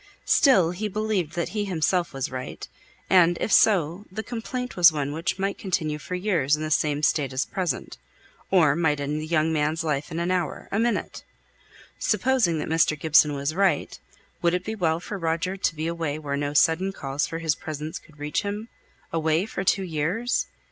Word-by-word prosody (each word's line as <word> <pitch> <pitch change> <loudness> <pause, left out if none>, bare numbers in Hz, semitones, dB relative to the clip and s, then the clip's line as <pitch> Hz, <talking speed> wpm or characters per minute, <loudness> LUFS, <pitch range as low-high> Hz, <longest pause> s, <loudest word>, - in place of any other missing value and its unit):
Still 190 - +4
he 200 +4 -3
believed 210 -5 -1
that 170 - -1
he 210 -1 -2
himself 180 -1 0
was 135 -2 -4
right, 130 0 -6 0.4
and, 175 -2 +5
if - - -2
so, 185 -2 +3
the 220 +4 -4
complaint 250 +2 -5
was 175 -2 +7
one 145 -2 -2
which 165 +5 -2
might 195 0 -2
continue 160 -6 -1
for 180 - -5
years 180 -7 +1
in 155 - -5
the 155 - -3
same 150 -1 +1
state 145 -4 +2
as 130 +2 -1
at - - -28
present, 185 - -3 0.5
or 160 -7 +4
might 155 -3 +1
end 145 +2 -2
the 155 - -6
young 160 0 +1
man's 155 +1 0
life 150 -2 -1
in 160 - -5
an 170 +1 -1
hour 180 -2 -2
a 200 - 0
minute. 235 -1 -1 0.8
Supposing 250 -11 +2
that 150 - -3
Mr. 155 -1 +2
Gibson 150 -2 +4
was 140 +2 -2
right, 190 -4 +1 0.4
would 170 +1 +2
it 180 - -3
be 220 - -3
well 165 -6 0
for 200 +3 -6
Roger 165 +3 -1
to 190 -3 -1
be 155 +1 -3
away 165 -3 -2
where 145 -2 -3
no 145 +1 -2
sudden 170 +5 +3
calls 140 -5 -2
for 165 - -5
his 165 -2 +1
presence 155 +1 -6
could 155 - -21
reach 145 0 -2
him 205 +3 -5 0.4
away 160 +2 +1
for 190 - -4
two 195 +1 +2
years? 180 +8 -1
165 Hz, 195 wpm, -25 LUFS, 150-190 Hz, 0.8 s, was